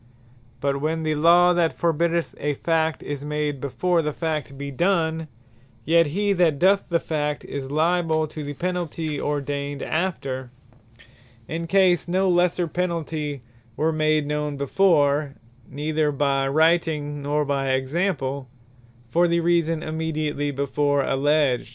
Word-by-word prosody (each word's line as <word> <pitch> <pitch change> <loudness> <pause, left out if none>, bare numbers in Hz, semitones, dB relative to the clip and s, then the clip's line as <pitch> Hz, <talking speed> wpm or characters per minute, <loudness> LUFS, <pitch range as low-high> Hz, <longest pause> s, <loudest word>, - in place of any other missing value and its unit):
But 140 0 0
when 160 +2 -1
the 155 0 0
Law 170 +3 +5
that 170 -2 +1
forbiddeth 170 0 0
a 145 0 -1
Fact, 160 +1 0
is 145 -1 -5
made 150 -2 -2
before 170 +5 0
the 150 -1 -2
Fact 155 -3 -3
be 140 0 -5
done; 160 0 0 0.6
yet 165 +1 +4
he 200 +6 0
that 170 -6 +2
doth 195 +5 +3
the 170 -1 +2
Fact, 150 -2 -2
is 140 -2 -5
lyable 160 +1 +1
to 155 - -6
the 145 0 -6
Penalty 165 -3 -3
ordained 145 -1 -3
after, 135 -7 -2 1.0
in 165 +1 -4
case 185 -1 +3
no 190 +2 +1
lesser 175 -1 +2
Penalty 155 -4 -3 0.4
were 160 +1 +1
made 155 -1 +1
known 150 -1 -2
before, 145 -2 +2 0.3
neither 150 +1 -1
by 140 -1 +1
Writing, 155 -1 +1
nor 145 +1 0
by 140 -1 -1
Example, 135 -1 -1 0.6
for 170 +8 +3
the 170 0 +2
reason 165 -1 +1
immediatly 155 -2 -2
before 140 0 0
alledged. 140 -3 +1
155 Hz, 135 wpm, -23 LUFS, 145-170 Hz, 1.0 s, Law